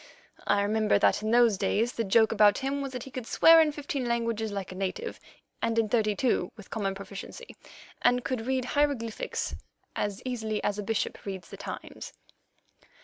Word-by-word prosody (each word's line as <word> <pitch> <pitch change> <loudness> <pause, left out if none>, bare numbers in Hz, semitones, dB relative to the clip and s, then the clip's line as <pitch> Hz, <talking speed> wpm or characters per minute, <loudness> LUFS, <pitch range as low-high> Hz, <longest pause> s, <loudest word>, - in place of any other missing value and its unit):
I 200 0 +3
remember 215 0 +2
that 200 - +3
in 215 - -2
those 230 -4 +4
days 230 +3 +1
the 230 - -1
joke 220 +2 +4
about 210 -2 +5
him 280 +1 -2
was 275 -1 -4
that 250 -1 -5
he 270 - -11
could 250 -3 -6
swear 330 0 +7
in 310 -1 +3
fifteen 285 -3 -4
languages 230 -2 -1
like 195 -3 -5
a - - -8
native 195 - -4 0.4
and 230 0 0
in 225 -2 +2
thirty 215 -2 +2
two 210 -6 0
with 210 - -13
common 195 -3 -2
proficiency, 200 - -9 0.5
and 245 0 +3
could 245 -3 -3
read 260 -1 0
hieroglyphics 280 -7 -1 0.4
as 205 -1 -2
easily 220 -4 -2
as 205 0 -1
a - - -3
bishop 225 +1 -2
reads 190 -4 -6
the - - -8
Times. - - -8
225 Hz, 185 wpm, -28 LUFS, 205-250 Hz, 0.5 s, swear